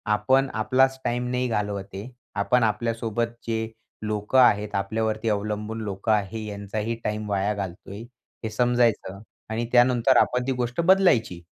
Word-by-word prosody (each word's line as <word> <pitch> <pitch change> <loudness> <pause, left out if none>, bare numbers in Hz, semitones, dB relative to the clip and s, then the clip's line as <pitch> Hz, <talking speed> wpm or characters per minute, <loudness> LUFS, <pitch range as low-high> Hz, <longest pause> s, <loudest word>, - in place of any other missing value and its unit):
आपण 130 +6 +2
आपलाच 130 +1 +2
टाईम 120 +1 -1
नाही 125 0 0
घालवत 105 -3 -2
आहे, 100 +6 -7 0.3
आपण 100 +5 +2
आपल्यासोबत 115 +1 -1 0.2
जे 110 -1 -1 0.4
लोकं 105 +4 +1
आहेत, 105 -4 +4
आपल्यावरती 110 +3 -1
अवलंबून 105 +1 -2
लोकं 100 +1 -2
आहे, 105 +1 -1
यांचाही 105 +2 -4
टाईम 105 0 -3
वाया 100 +1 0
घालतोय, 100 0 -6 0.4
हे 110 - -2
समजायचं 120 -4 +1 0.3
आणि 115 +2 -2
त्यानंतर 125 +1 +4
आपण 125 +1 +2
ती - - +1
गोष्ट 125 +3 -1
बदलायची. 165 - +3
110 Hz, 140 wpm, -25 LUFS, 105-120 Hz, 0.4 s, आहेत